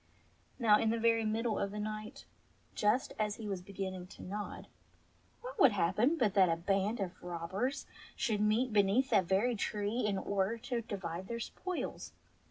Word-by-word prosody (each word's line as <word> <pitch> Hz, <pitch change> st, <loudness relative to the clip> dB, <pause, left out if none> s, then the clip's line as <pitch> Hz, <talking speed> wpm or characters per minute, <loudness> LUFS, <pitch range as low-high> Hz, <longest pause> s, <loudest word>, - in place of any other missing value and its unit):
Now 215 Hz, -4 st, +5 dB
in 225 Hz, -, +2 dB
the 230 Hz, -, +1 dB
very 230 Hz, 0 st, +3 dB
middle 220 Hz, +1 st, 0 dB
of 200 Hz, -, 0 dB
the 205 Hz, -, -7 dB
night, 215 Hz, 0 st, -5 dB, 0.5 s
just 210 Hz, +5 st, +1 dB
as 210 Hz, -1 st, 0 dB
he 220 Hz, -, -7 dB
was 195 Hz, -3 st, -3 dB
be 185 Hz, -, -12 dB
ginning 190 Hz, -2 st, -4 dB
to -, -, -11 dB
nod, 205 Hz, +2 st, -5 dB, 0.8 s
what -, -, -8 dB
should 275 Hz, -, +6 dB
happen 205 Hz, -, +2 dB
but 215 Hz, -9 st, +2 dB
that 190 Hz, -3 st, +5 dB
a 165 Hz, -, +3 dB
band 195 Hz, +6 st, 0 dB
of 185 Hz, -3 st, -4 dB
robbers 180 Hz, +10 st, -3 dB, 0.3 s
should 210 Hz, -3 st, 0 dB
meet 215 Hz, +3 st, +2 dB
beneath 210 Hz, +6 st, +3 dB
that 185 Hz, -, +4 dB
very 205 Hz, +7 st, +2 dB
tree 210 Hz, +2 st, -1 dB
in 205 Hz, -2 st, +1 dB
order 200 Hz, +3 st, 0 dB
to 245 Hz, 0 st, -3 dB
divide 190 Hz, -5 st, -5 dB
their 235 Hz, +1 st, -4 dB
spoils. 365 Hz, +9 st, -5 dB
210 Hz, 175 wpm, -33 LUFS, 195-230 Hz, 0.8 s, should